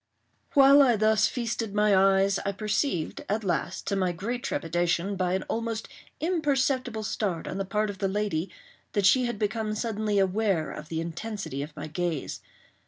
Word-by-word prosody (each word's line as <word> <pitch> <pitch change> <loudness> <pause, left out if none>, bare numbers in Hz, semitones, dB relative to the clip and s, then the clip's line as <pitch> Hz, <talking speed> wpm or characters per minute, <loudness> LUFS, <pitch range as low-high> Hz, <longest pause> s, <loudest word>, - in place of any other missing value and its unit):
While 280 +1 +8
I 250 -4 +5
thus 215 0 +3
feasted 230 -4 -3
my 210 -1 +4
eyes, 195 +1 +4
I 200 - -1
perceived, 205 - -1
at 215 +2 0
last, 180 0 -2
to 200 - -1
my 185 -2 +1
great 230 +9 -4
trepidation, 175 0 0
by 185 -1 0
an 190 - -2
almost 225 -1 -3 0.3
imperceptible 270 -8 0
start 195 -6 -2
on - - -4
the 195 - -1
part 210 +2 0
of 195 - -12
the 195 - +1
lady, 195 -4 -1 0.4
that 205 -3 +1
she 255 +5 +5
had 240 -3 -2
become 215 0 -1
suddenly 215 -2 -1
aware 195 -3 +1
of 150 +1 -8
the 160 0 -2
intensity 170 -3 -5
of 150 +1 -7
my - - -6
gaze. 160 -1 -3
205 Hz, 170 wpm, -27 LUFS, 185-225 Hz, 0.4 s, While